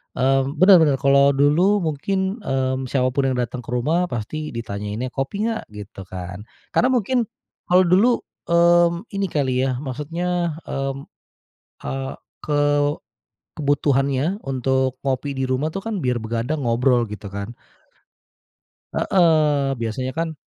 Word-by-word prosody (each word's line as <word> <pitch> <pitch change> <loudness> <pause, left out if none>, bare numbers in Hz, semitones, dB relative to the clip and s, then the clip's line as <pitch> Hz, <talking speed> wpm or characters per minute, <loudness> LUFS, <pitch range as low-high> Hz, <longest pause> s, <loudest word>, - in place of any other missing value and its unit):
Mmm, 135 +1 +1
benar 185 0 +8
benar, 150 -4 +4
kalau 140 0 +4
dulu 175 +8 +3
mungkin, 190 - -1
mmm, 130 -5 -1
siapapun 130 +1 +1
yang 125 - -2
datang 125 +1 -3
ke 125 - -11
rumah 160 +9 +1
pasti 150 +5 -4
ditanyainnya 105 +2 -4
kopi 200 +12 -2
nggak? 225 -1 -2
gitu 105 0 -9
kan. 90 +2 -7 0.3
Karena 250 - +3
mungkin, 245 -1 +1 0.4
kalau 180 +1 +5
dulu, 195 +8 +3 0.2
mmm, 170 +1 +4
ini 195 -1 -1
kali 130 -4 0
ya, 130 - -1
maksudnya, 165 +5 -2
mmm, 135 0 -3 0.9
eee, 135 0 -3 0.3
ke 150 -1 0 1.0
kebutuhannya 140 +3 +1
untuk 130 0 0
ngopi 135 +1 -2
di 135 -1 -2
rumah 135 +5 -1
tuh 195 - -4
kan, 225 +1 -4
biar 125 -5 0
begadang 115 +7 -2
ngobrol 120 0 +2
gitu 105 0 -8
kan. 100 +4 -6 1.4
Heeh. 150 -6 +2
Biasanya 115 +3 -3
kan 165 -1 -2
140 Hz, 130 wpm, -22 LUFS, 130-170 Hz, 1.4 s, benar